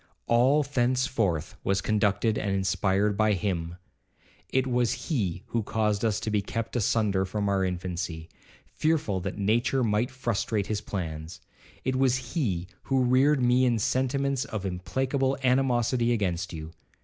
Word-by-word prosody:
All 130 +6 +4
thenceforth 125 - 0
was 95 0 +1
conducted 105 +1 +1
and 105 - -2
inspired 95 +2 +1
by 110 +1 +3
him. 85 -3 -2 0.7
It 130 0 +1
was 125 -2 0
he 100 - -1
who 115 - 0
caused 105 -1 0
us 110 -2 +1
to 110 -2 -2
be 105 -1 +2
kept 115 +4 -4
asunder 105 -4 +1
from 100 +2 -2
our 100 -1 +1
infancy, 90 -2 -3 0.4
fearful 150 -12 0
that 95 +2 -5
nature 120 +6 +1
might 110 +2 +1
frustrate 115 -5 -1
his 105 0 -2
plans,—it 80 +7 -6
was 130 -1 +1
he 95 - -1 0.2
who 135 -1 +2
reared 130 +2 +3
me 125 +1 +4
in 120 -2 +3
sentiments 130 +4 0
of 105 -4 -5
implacable 130 +9 -1
animosity 125 -2 +2
against 95 -4 -1
you. 80 -1 -7
110 Hz, 140 wpm, -27 LUFS, 95-130 Hz, 0.7 s, All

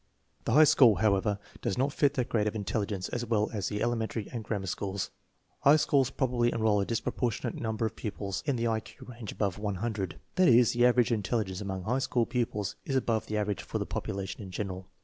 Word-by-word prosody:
The 115 - +1
high 155 +4 +8
school, 125 -7 +6
however, 100 -1 +2 0.2
does 95 - -1
not 135 +2 +1
fit 145 -1 +2
their 125 - +1
grade 105 -3 0
of 105 - -2
in 105 -2 -3
telligence 100 -2 -2
as 120 - -1
well 110 -2 0
as 100 -3 -2
the 105 +1 -2
elementary 115 -2 -1
and 115 -3 -4
grammar 105 -2 -3
schools. 95 0 -3 0.5
High 140 +2 +6
schools 140 -4 +3
probably 125 -3 +1
enroll 110 -3 +2
a 100 - -2
disproportionate 115 0 -2
number 110 0 -1
of, 110 0 -3
pupils 100 -3 -4
in 140 - +2
the 115 0 0
I 110 -1 +1
Q - - -13
range 115 -4 -7
above 100 -2 -2
100. 105 -2 -3 0.2
That 185 - +5
is, 120 -2 +6
the 120 0 +5
average 125 -1 +3
in 110 -3 +1
telligence 100 -2 -2
among 95 -2 -4
high 125 +8 0
school 125 -3 +1
pupils 110 -5 -2
is 135 - -2
above 115 -4 0
the 105 - -2
average 105 -1 -1
for - - -4
the - - -2
population 95 +2 -4
in 95 - -7
general. 95 -1 -5
110 Hz, 220 wpm, -29 LUFS, 100-120 Hz, 0.5 s, high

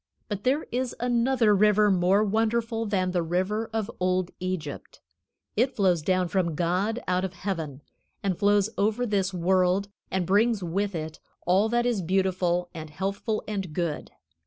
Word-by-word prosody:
But 205 -1 -4
there 275 +5 +2
is 250 0 -2
another 240 -2 +2
river 210 +1 +4
more 190 +3 +3
wonderful 225 +1 0
than 185 -3 0
the 180 -1 +1
river 185 +7 -1
of 220 0 -2
old 185 0 0
Egypt. 180 -6 -5 0.6
It 250 +4 +1
flows 185 -5 +2
down 185 +2 +1
from 170 -3 0
God 185 +8 0
out 185 0 +1
of 190 -1 -3
heaven, 160 -7 -4 0.4
and 195 -2 0
flows 205 +2 +2
over 220 +4 +1
this 200 -4 0
world, 185 +2 +1 0.2
and 190 -2 -1
brings 210 +2 +2
with 195 +3 -1
it 155 -1 -5 0.3
all 190 +5 +3
that 240 +1 +1
is 235 -5 +1
beautiful 180 -1 +1
and 160 -2 -7
healthful 195 +7 -3
and 195 -6 -4
good. 170 -2 -2
195 Hz, 160 wpm, -26 LUFS, 180-215 Hz, 0.6 s, river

